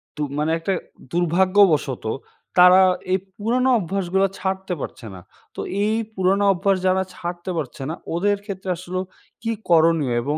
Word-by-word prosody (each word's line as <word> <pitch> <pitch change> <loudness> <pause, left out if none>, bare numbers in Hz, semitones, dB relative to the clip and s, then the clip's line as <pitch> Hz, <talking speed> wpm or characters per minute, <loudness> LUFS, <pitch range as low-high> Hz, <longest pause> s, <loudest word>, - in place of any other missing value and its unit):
তো 150 - -6 0.2
মানে 155 +2 0
একটা 190 +3 -1 0.4
দুর্ভাগ্যবশত 175 - +2 0.5
তারা 180 +1 +8 0.3
এই 190 - +3 0.2
পুরোনো 250 +5 +1
অভ্যাসগুলো 190 +1 0
ছাড়তে 190 -1 -2
পারছে 115 - -7
না। 90 - -11 0.3
তো - - -4 0.2
এই 215 +1 +1 0.2
পুরোনো 190 +2 +2
অভ্যাস 195 +2 +1
যারা 190 +1 +2
ছাড়তে 175 +1 -6
পারছে 135 -3 -5
না 165 - -3 0.2
ওদের 205 +3 +1
ক্ষেত্রে 190 -2 -6
আসলেও 185 +1 -4 0.4
কী 230 - -1 0.2
করণীয় 160 -6 +4
এবং 145 +5 -2
185 Hz, 145 wpm, -22 LUFS, 165-195 Hz, 0.5 s, তারা